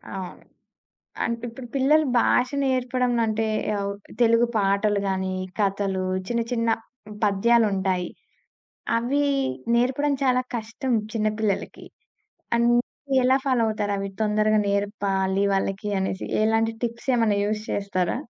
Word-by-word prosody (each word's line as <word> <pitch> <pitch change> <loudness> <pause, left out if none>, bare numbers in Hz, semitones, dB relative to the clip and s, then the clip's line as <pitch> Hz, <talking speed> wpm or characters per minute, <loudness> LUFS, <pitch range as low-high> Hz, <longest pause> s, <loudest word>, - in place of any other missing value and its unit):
అవును. 185 -2 -7 0.8
అం 235 - 0
ఇప్పుడు 245 +2 -8
పిల్లలు 295 +3 +4
భాష 250 +2 +3 0.2
నేర్పడం 255 -1 0
అంటే 220 0 0 0.3
అవు 200 0 -2 0.3
తెలుగు 230 0 +5
పాటలు 200 +1 +2
గాని, 190 0 -1 0.3
కథలు, 195 -1 0 0.2
చిన్న 235 +1 0
చిన్న 230 -1 0 0.6
పద్యాలుంటాయి. 195 -4 +2 0.9
అవి 265 +5 0 0.5
నేర్పడం 265 +4 +1
చాలా 255 -1 +3
కష్టం 230 +4 -4 0.2
చిన్న 215 -2 0
పిల్లలకి. 210 -3 -2 0.7
అన్నీ 240 +3 +1
ఎలా 260 +1 +4
ఫాలో 255 -3 +2
అవుతారవి 205 -2 -2
తొందరగా 215 0 +2
నేర్పాలి 200 -1 0
వాళ్ళకి 195 +1 -1
అనేసి? 190 0 -2 0.2
ఎలాంటి 225 +1 +2
టిప్స్ 235 +3 -3
ఏమన్నా 220 -4 +2
యూస్ 210 0 -2
చేస్తారా? 185 -1 -1
215 Hz, 110 wpm, -24 LUFS, 200-240 Hz, 0.9 s, తెలుగు